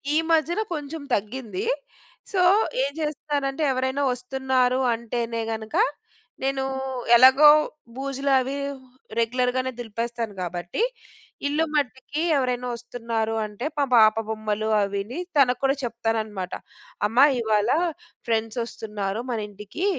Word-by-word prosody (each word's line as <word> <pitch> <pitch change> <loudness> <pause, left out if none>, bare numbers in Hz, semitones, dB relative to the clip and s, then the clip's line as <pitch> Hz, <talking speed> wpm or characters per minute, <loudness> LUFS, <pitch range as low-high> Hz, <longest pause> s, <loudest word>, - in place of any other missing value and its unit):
ఈ - - +5
మధ్యన 330 +5 +2
కొంచెం 300 0 -5
తగ్గింది. 240 - -4 0.7
సో 380 - +2 0.4
ఏం 280 - -1
చేస్తున్నానంటే 295 -1 -2
ఎవరైనా 260 +2 -1
వస్తున్నారు 255 0 0
అంటేనే 230 0 -3
గనుక 220 +4 -5 0.7
నేను 270 0 0 0.5
ఎలాగో 265 +4 +8 0.5
బూజులు 275 +1 -2
అవి 265 +2 -2 0.6
రెగ్యులర్‌గనే 250 +2 +1
దులిపేస్తాను 230 -1 -4
కాబట్టి 175 - -2 0.6
ఇల్లు 305 +3 +1
మట్టికి 280 +1 -1 0.2
ఎవరైనా 250 -1 -1
వస్తున్నారు 230 -2 -3
అంటే 210 +5 -6
పమా 280 -1 +2 0.2
పాప 215 +1 +2
బొమ్మలు 215 0 -2
అవిని 200 - -3 0.2
తనకు 250 -3 +4
కూడా 270 0 +3
చెప్తానన్నమాట. 220 -5 -2 0.5
అమ్మా 245 +6 +6 0.2
ఇవాళ 215 -1 +2 0.6
ఫ్రెండ్స్ 225 +1 0
వస్తున్నారు 210 -2 -4
మన 230 - -1
ఇంటికి. 210 - -5
245 Hz, 110 wpm, -24 LUFS, 220-270 Hz, 0.7 s, ఎలాగో